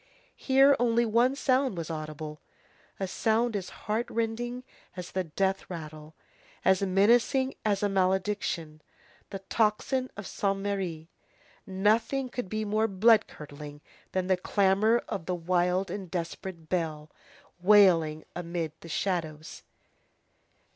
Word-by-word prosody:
Here 270 +1 +5
only 235 0 +3
one 235 +4 +3
sound 260 -6 +1
was 165 -1 -4
audible, 155 -1 -6 0.6
a 195 - -1
sound 225 +4 +1
as 190 -3 -3 0.2
heart 220 +3 -1
rending 240 +2 -2 0.3
as 180 -1 -6
the 185 -1 -2
death 190 +4 -1
rattle, 155 -2 -8 0.5
as 190 0 +4
menacing 230 +7 +3
as 205 -2 0
a - - +4
malediction, 190 -4 -1 0.5
the 195 - -6
tocsin 235 +4 +1
of 200 - -6
Saint 195 +1 -1
Merry. 190 -5 -3 0.6
Nothing 220 +7 +1
could 245 -6 -5
be 215 +1 -2
more 215 +2 +1
blood 215 +2 +4
curdling 145 0 -10 0.3
than 185 -1 -1
the 185 0 +2
clamor 200 +5 +2
of 165 - -5
that 180 - 0
wild 180 +2 0
and 190 -2 -6
desperate 170 -1 -5
bell, 155 -3 -2 0.5
wailing 175 -6 +5
amid 170 -2 -3
the 165 - -12
shadows. 160 -3 -3
190 Hz, 125 wpm, -28 LUFS, 170-220 Hz, 0.6 s, Here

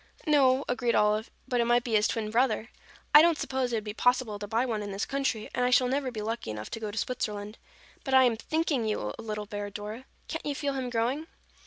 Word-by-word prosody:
"No," 275 -3 +4
agreed 245 -1 0
Olive, 210 +1 +2 0.2
"but 245 -1 +1
it - - +2
might 240 0 +3
be 235 - -4
his 210 0 +4
twin 215 -2 -2
brother. 230 -1 +1 0.4
I 300 - +11
don't 335 -1 +4
suppose 260 -3 -1
it - - 0
would 215 - -2
be 210 -1 -5
possible 245 -3 +1
to 205 - -5
buy 230 +4 +1
one 220 -4 -2
in 205 -1 -5
this 195 +1 -2
country, 270 -6 -1
and 250 - 0
I 250 - +3
shall 250 0 +4
never 270 +1 0
be 220 -4 -5
lucky 225 - -3
enough 105 0 -6
to - - -4
go 215 -1 -4
to 205 - -7
Switzerland. 210 -3 -3 0.4
But 270 -1 +1
I 260 - +8
am 240 -3 +3
thinking 300 0 -1
you 105 - -2
a - - -4
little 210 -2 -4
bear, 205 0 -5
Dora. 210 +5 -7 0.2
Can't 325 - -4
you 290 - -1
feel 280 0 -2
him 260 -2 -3
growing?" 245 +7 -1
235 Hz, 245 wpm, -28 LUFS, 210-260 Hz, 0.4 s, I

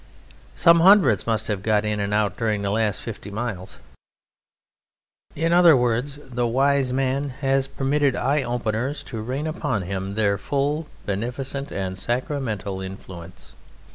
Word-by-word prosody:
Some 170 -1 +6
hundreds 170 - +5
must 110 -1 0
have 105 -3 -2
got 105 0 +1
in 105 0 -1
and 100 0 -2
out 105 -2 +1
during 105 -3 -1
the 100 - -1
last 105 -1 0
fifty 110 -2 -7
miles!" 100 -3 -5 1.6
In 165 +2 +1
other 175 -4 +7
words, 125 +4 0
the 125 -2 -2
wise 135 +2 +2
man 135 +2 0
has 135 -1 +1
permitted 140 0 +1
eye 140 +3 +1
openers 120 +2 -2
to 115 -4 -6
rain 130 +7 -3
upon 155 - -2
him 95 +1 -4
their 100 -3 +1
full, 145 +6 -1 0.2
beneficent, 125 +7 -4
and 95 -1 -4
sacramental 115 -5 -2
influence. 95 -2 -10
120 Hz, 140 wpm, -23 LUFS, 105-140 Hz, 1.6 s, other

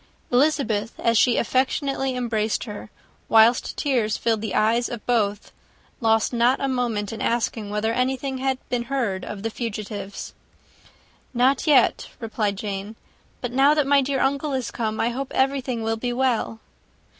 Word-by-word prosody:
Elizabeth, 245 -5 +1
as 230 0 +2
she 240 +2 +4
affectionately 265 +2 0
embraced 225 -3 -1
her, 210 -2 -8 0.4
whilst 225 +2 +4
tears 240 -7 0
filled 225 -2 0
the 220 -2 -3
eyes 230 +3 +2
of 235 -3 -7
both, 210 -4 0 0.5
lost 225 0 +2
not 240 +3 +3
a 275 - 0
moment 235 -5 -1
in 220 - -7
asking 225 -2 -1
whether 210 +2 -1
anything 260 +2 -1
had 265 0 0
been 240 -1 -1
heard 230 -9 -2
of 205 -1 -7
the 225 - -2
fugitives. 210 -3 -5 1.0
"Not 260 +5 +2
yet," 290 -3 +4
replied 215 -3 -2
Jane. 205 +1 -5 0.5
"But 245 - -3
now 275 +4 +4
that 300 -2 +2
my 280 0 +4
dear 270 0 -1
uncle 280 +2 0
is 260 -2 -2
come, 220 -2 -3
I 230 - +2
hope 260 +3 -4
everything 265 -3 0
will 225 0 -1
be 245 +2 -2
well." 240 -3 0
235 Hz, 155 wpm, -23 LUFS, 220-265 Hz, 1.0 s, she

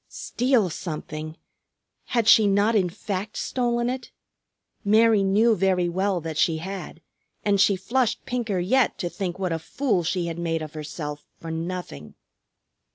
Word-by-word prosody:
Steal 240 -7 +1
something! 155 -1 -6 0.7
Had 235 -3 0
she 220 -1 +7
not 200 +3 +3
in 190 -5 +2
fact 200 +3 -5
stolen 240 -1 0
it? 255 +1 -4 0.7
Mary 220 0 +5
knew 210 +4 +4
very 185 -2 +2
well 190 +2 0
that 160 -1 -4
she 165 -2 +3
had, 180 -1 -7 0.4
and 200 -2 +3
she 200 -1 +5
flushed 240 +4 0
pinker 235 -6 -2
yet 225 +9 +2
to 175 - -2
think 185 -3 -4
what 185 -2 -2
a 165 - -2
fool 215 - 0
she 175 +1 -1
had 170 0 -4
made 165 -2 -1
of 155 - -8
herself 150 -1 -6
for 165 - -6
nothing. 165 - -5
190 Hz, 155 wpm, -25 LUFS, 165-220 Hz, 0.7 s, she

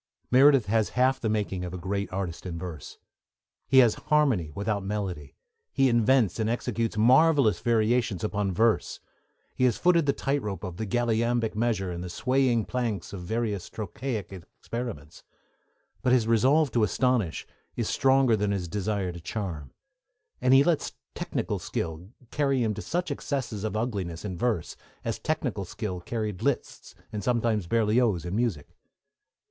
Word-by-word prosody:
Meredith 135 -1 +6
has 110 +1 +1
half 130 +1 +3
the 110 - -1
making 105 -4 -1
of 90 0 -5
a - - -4
great 100 +3 -3
artist 95 -2 -4
in 85 -2 -5
verse. 85 -5 -8 0.7
He 135 - +3
has 115 - +2 0.2
harmony 135 - +3
without 100 0 -1
melody; 95 -8 -4 0.4
he 135 -1 +3
invents 120 -3 +3
and 110 0 +1
executes 115 -2 -2
marvellous 130 +1 +5
variations 115 -3 +1
upon 105 -2 -1
verse; 110 +5 +1 0.5
he 130 - +1
has 120 -4 +2
footed 170 -3 +3
the - - +5
tight 140 +1 -1
rope 100 -4 -5
of 90 -3 -6
the 110 - -3
galliambic 115 0 +1
measure 105 -4 0
and 85 0 -5
the 90 - -6
swaying 125 +2 +1
planks 115 -8 -3
of 95 - -6
various 105 0 -2
trochaic 110 0 -5
experiments; 95 - -7 0.8
but 125 - +1
his 125 -3 +4
resolve 130 +6 +3
to 120 - +1
astonish 115 -4 0 0.3
is 115 -3 -2
stronger 135 -3 +3
than 105 -1 0
his 95 -3 -2
desire 100 0 -2
to 85 -1 -9
charm, 85 - -5 0.7
and 130 +1 +5
he 135 - +7
lets 165 -1 0 0.2
technical - - -3
skill 80 +3 -4 0.2
carry 140 -4 +1
him 110 - +1
into 105 - -5
such 175 +2 -2
excesses 125 -8 -3
of 110 0 -2
ugliness 100 -7 -3
in 95 -3 -4
verse 110 -2 -1 0.3
as - - -2
technical - - -2
skill 100 -5 -5
carried 105 -1 -4
Liszt, - - -2 0.2
and 105 - -4
sometimes 115 -6 0
Berlioz, 110 -3 +2
in 90 +2 -3
music. 110 -11 -2
110 Hz, 160 wpm, -27 LUFS, 95-125 Hz, 0.8 s, he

